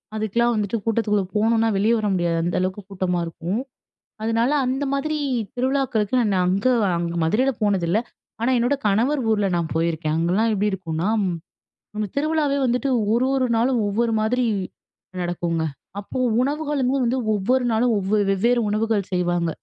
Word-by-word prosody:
அதுக்கெல்லாம் 235 +3 +1
வந்துட்டு 210 +1 -1
கூட்டத்துக்குள்ள 215 -3 +1
போனோம்னா 225 +1 +2
வெளிய 215 +4 +3
வர 215 -1 -1
முடியாது. 175 -2 0
அந்த 175 - -1
அளவுக்கு 185 +2 -2
கூட்டமா 185 -2 -1
இருக்கும். 170 +6 -3 0.6
அதனால 230 +3 +1
அந்த 260 +3 -1
மாதிரி 305 +3 -1 0.4
திருவிழாக்களுக்கு 255 -4 0
நான் 210 -4 +1
அங்க 195 +6 +1 0.3
அங் 170 0 -1 0.2
மதுரையில 240 +12 +2
போனதில்ல. 195 -1 +1 0.4
ஆனா 240 +3 +2
என்னோட 245 +4 +2
கணவர் 235 +8 +2
ஊர்ல 210 -2 +2
நான் 170 -2 -2
போயிருக்கேன். 160 -1 0
அங்கல்லாம் 185 +7 +1
எப்டி 210 +1 +1
இருக்கும்னா, 170 -2 -3 0.9
ம் 210 - -1
திருவிழாவே 300 -1 +1
வந்துட்டு 250 +3 0 0.2
1 240 +3 +2
1 260 -1 +2
நாளும் 240 +2 +2
ஒவ்வொரு 230 +3 0
மாதிரி 245 +3 +1 0.8
நடக்குங்க. 175 -2 -1 0.4
அப்போ 205 - -7 0.2
உணவுகளுமே 285 -1 0
வந்து 245 +2 +1 0.2
ஒவ்வொரு 245 +6 +1
நாளும் 230 +1 +2
ஒவ்வ 200 +3 0
வெவ்வேறு 235 +6 +2
உணவுகள் 215 -2 0
செய்வாங்க. 175 -2 0
215 Hz, 145 wpm, -22 LUFS, 185-245 Hz, 0.9 s, வெளிய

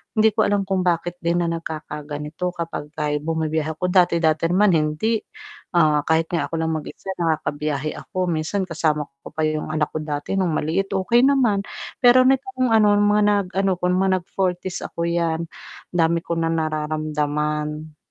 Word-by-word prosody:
hindi 220 0 +5
ko 215 - +3
alam 200 -1 +1
kung 190 -1 0
bakit 175 -1 0
din 170 +1 +1
na - - -1
nagkakaganito 155 0 -5
kapag 165 -3 -5
ka 150 -1 -1
bumibiyahe 160 -1 -1
ako, 180 - -2
dati-dati 170 -3 +3
naman 195 +2 +4
hindi, 155 +9 +1 0.6
ah, 150 -2 +4
kahit 160 0 +3
nga 170 - 0
ako - - -4
lang 160 0 0
mag-isa 155 +5 -6
nakakabiyahe 155 -2 -1
ako 185 0 -3
minsan 160 +5 -1
kasama 155 -3 0 0.2
ko - - -8
pa 155 - -1
yung 155 0 -2
anak 150 -1 0
ko 155 - -2
dati 145 +1 -4
nung 185 -3 +1
maliit 170 +7 -1
okey 230 +6 +3
naman, 245 -8 +3 0.4
pero 255 0 +7
nitong 260 -1 +1
ano 210 -2 +5
mga 205 0 +3 0.3
nag-ano 195 0 +1
ko, - - -29
mga 190 +1 +2
nag - - -29
40's 185 -1 -1 0.2
'yan, 170 -1 0 0.5
dami 170 -1 +2
ko - - -2
na 165 0 0
nararamdaman. 150 -1 -2
165 Hz, 160 wpm, -22 LUFS, 155-190 Hz, 0.6 s, pero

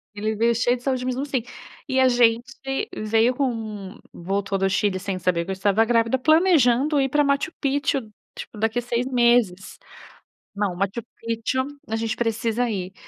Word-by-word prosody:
Ele 215 +1 -2
veio 230 +2 +2
cheio 245 +2 +2
de 245 - -17
saúde, 255 -2 -1
mesmo 255 +1 -2
assim. 265 -4 -2 0.5
E, 260 0 +1
a 260 - +5
gente 240 -1 +3 0.5
veio 225 +3 +2
com 270 0 +1
um 215 -2 -7
voltou 195 +2 -2
do 195 0 +1
Chile, 190 0 +1
sem 190 -1 -4
saber 175 -1 0
que 195 - -6
eu - - 0
estava 200 +3 +2
grávida, 230 +1 +2
planejando 300 -2 +3
ir 270 - 0
pra 295 +3 +2
Machu 280 +5 0
Picchu, 280 0 0 0.3
tipo, - - -9
daqui 225 +2 0
a - - -3
6 240 0 -2
meses. 235 -7 +2 0.8
"Não, 200 -3 -1
Machu 195 +5 -2 0.2
Picchu, 230 +3 -1 0.2
a 220 - -3
gente 225 0 -2
precisa 230 +1 -1
ir. 190 -4 -4
230 Hz, 180 wpm, -23 LUFS, 205-255 Hz, 0.8 s, a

